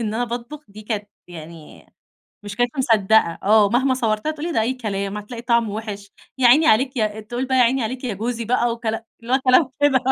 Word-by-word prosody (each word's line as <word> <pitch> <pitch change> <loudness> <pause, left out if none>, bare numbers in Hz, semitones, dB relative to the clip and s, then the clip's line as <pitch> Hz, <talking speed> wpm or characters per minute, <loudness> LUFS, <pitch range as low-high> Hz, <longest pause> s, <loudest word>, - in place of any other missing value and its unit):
إن 215 -1 -3
أنا 245 +2 0
باطبُخ 245 +5 -7
دي 210 +2 -12
كانت 210 -1 -4 0.2
يعني، 165 -2 -12 0.6
مش 200 -1 -7
كانت 245 0 +1
مصدّقة 220 -8 +2
آه. 210 0 +4
مهما 260 +4 +1
صوّرت 220 -4 -1
لها 310 - +1
تقول 310 +2 -6
لي: 345 - -3
"ده 225 - +1
أي 245 +4 0
كلام، 200 -4 -4
هتلاقي 230 +3 -8
طعمُه 235 -3 +1
وِحش." 205 -2 -7 0.3
يا 250 - +4
عيني 305 +6 +5
عليك، 260 0 +3
يا 215 -1 -1
تقول 240 +4 -4
بقى: 260 0 0
"يا 250 - +6
عيني 250 +1 +2
عليك 255 +3 -5
يا 235 - -2
جوزي." 230 +3 -3
بقى 240 +1 +1
وكلا 230 -1 -4 0.2
اللي 240 +2 -5
هو - - +4
كلام 255 +1 +4
كده 280 -2 +4
230 Hz, 225 wpm, -21 LUFS, 210-255 Hz, 0.6 s, يا